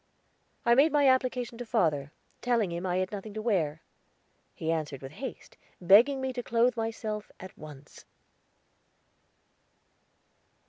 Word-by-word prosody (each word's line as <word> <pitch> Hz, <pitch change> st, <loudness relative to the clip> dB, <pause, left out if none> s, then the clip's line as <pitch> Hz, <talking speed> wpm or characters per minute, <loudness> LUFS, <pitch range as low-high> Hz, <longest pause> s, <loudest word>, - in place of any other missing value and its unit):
I 235 Hz, -, +5 dB
made 280 Hz, +6 st, +5 dB
my 290 Hz, -1 st, +4 dB
application 250 Hz, -2 st, +1 dB
to 245 Hz, -, -5 dB
father, 155 Hz, -, 0 dB, 0.3 s
telling 235 Hz, -6 st, +1 dB
him 170 Hz, +2 st, -4 dB
I 180 Hz, 0 st, 0 dB
had 185 Hz, 0 st, -1 dB
nothing 205 Hz, +1 st, -7 dB
to 215 Hz, -, -3 dB
wear. 165 Hz, -9 st, 0 dB, 0.7 s
He 160 Hz, 0 st, -2 dB
answered 150 Hz, -4 st, -3 dB
with 135 Hz, -, -8 dB
haste, 265 Hz, -, -8 dB, 0.2 s
begging 225 Hz, +10 st, +5 dB
me 265 Hz, 0 st, -3 dB
to 245 Hz, -, -3 dB
clothe 235 Hz, +1 st, +2 dB
myself 225 Hz, -2 st, -4 dB
at 185 Hz, 0 st, -10 dB
once. 145 Hz, -2 st, -13 dB
215 Hz, 135 wpm, -29 LUFS, 170-245 Hz, 0.7 s, I